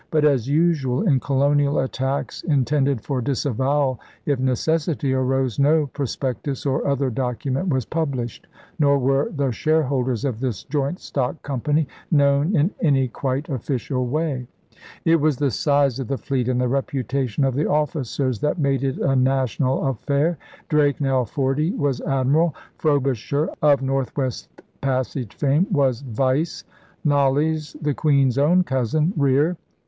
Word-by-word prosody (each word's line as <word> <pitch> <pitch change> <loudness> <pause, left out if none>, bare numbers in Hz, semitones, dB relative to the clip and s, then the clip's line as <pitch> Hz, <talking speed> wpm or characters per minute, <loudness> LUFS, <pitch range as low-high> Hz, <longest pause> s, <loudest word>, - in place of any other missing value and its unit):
But, 155 -1 +2
as 135 -4 +2
usual 145 -4 +2
in 145 -11 +3
colonial 140 +2 +2
attacks 135 +1 -2
in 140 -6 +1
tended 140 -4 +1
for 135 -3 -2
disavowal 135 0 0 0.3
if 140 -3 0
necessity 145 +2 0
arose, 130 -2 0
no 150 +2 +4
pros 140 -4 -3
pectus 135 +1 -3
or 135 0 0
other 140 -2 0
document 130 - -2
was 130 -6 0
published, 135 -8 -3 0.3
nor 140 -1 +4
were 135 +1 +1
the 140 -4 -1
shareholders 130 -3 0
of 125 -5 -2
this 125 -6 -3
joint 145 +4 -2
stock 135 +3 -3
company 145 +3 0 0.2
known 145 +4 +3
in 160 +5 +2
any 135 -6 +2
quite 135 +4 -3
official 130 -1 -2
way. 140 -2 -2 0.6
It 165 0 +5
was 150 -3 +2
the 140 -1 +1
size 140 -1 +1
of 130 - -4
the 135 - -2
fleet 130 -3 -2
and 125 -1 +1
the 125 - +1
reputation 135 -1 -1
of 135 - +1
the 145 +4 0
officers 140 -5 -1
that 150 - 0
made 140 -4 +1
it 135 -1 -1
a 135 - +1
national 130 0 +1
affair. 140 +5 0 0.3
Drake, 145 -2 +2
now 135 -3 +1
forty, 140 - 0
was 140 -4 -1
'Admiral'; 140 +4 +1 0.2
Frobisher, 140 -1 0
of 145 -3 +4
North 135 0 -2
West 130 -4 -2 0.3
Passage 130 -3 -2
fame, 150 +6 +2
was 135 -7 +2
'Vice'; 135 +5 -1 0.4
Knollys, 145 +2 +1
the 150 -2 0
Queen's 140 -3 +2
own 175 +6 +4
cousin, 150 - 0
'Rear.' 145 +4 +2
140 Hz, 150 wpm, -22 LUFS, 130-150 Hz, 0.6 s, It